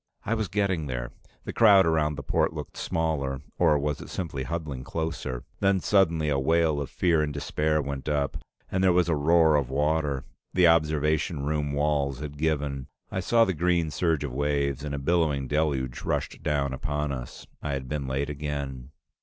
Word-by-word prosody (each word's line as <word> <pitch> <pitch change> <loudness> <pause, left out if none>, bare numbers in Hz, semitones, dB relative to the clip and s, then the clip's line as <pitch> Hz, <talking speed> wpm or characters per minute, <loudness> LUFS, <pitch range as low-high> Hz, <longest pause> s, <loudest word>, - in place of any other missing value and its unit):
I 115 - 0
was 110 -3 -1
getting 95 -5 0
there. - - -4 0.3
The - - -5
crowd 100 -4 +6
around 80 -2 +1
the 70 - -6
port 65 - +1
looked - - -7
smaller, 70 -4 -2 0.2
or 80 -4 +5
was 75 0 -2
it - - -9
simply 80 -7 -4
huddling 75 -3 -4
closer? 80 -7 -4 0.2
Then 100 -1 +3
suddenly, 85 -6 +2
a 70 -2 +1
wail 80 +1 +2
of 70 - -4
fear 85 -4 +2
and 75 -1 -1
despair 75 +1 0
went 70 +1 -4
up, 70 -1 0 0.3
and 95 0 +1
there 95 -1 +5
was 90 -1 +3
a 80 - +3
roar 80 +1 +4
of 70 -4 +1
water. 75 -1 0 0.3
The 90 -1 +5
observation 75 -1 +2
room 75 -1 -1
walls 70 -2 0
had 75 -1 -6
given. 75 -4 -1 0.2
I - - -2
saw 115 +5 +4
the 95 - 0
green 85 -1 +1
surge 80 -1 0
of 70 -4 -4
waves, 70 0 0
and 70 -1 -3
a - - -3
billowing 75 -2 +1
deluge 70 -4 -1
rushed - - -2
down 70 -2 0
upon 75 +2 -2
us. 65 -3 -7 0.2
I 75 - -2
had 65 -2 -4
been 70 0 -3
late 70 +2 -1
again. 70 -3 -5
75 Hz, 185 wpm, -27 LUFS, 70-80 Hz, 0.3 s, crowd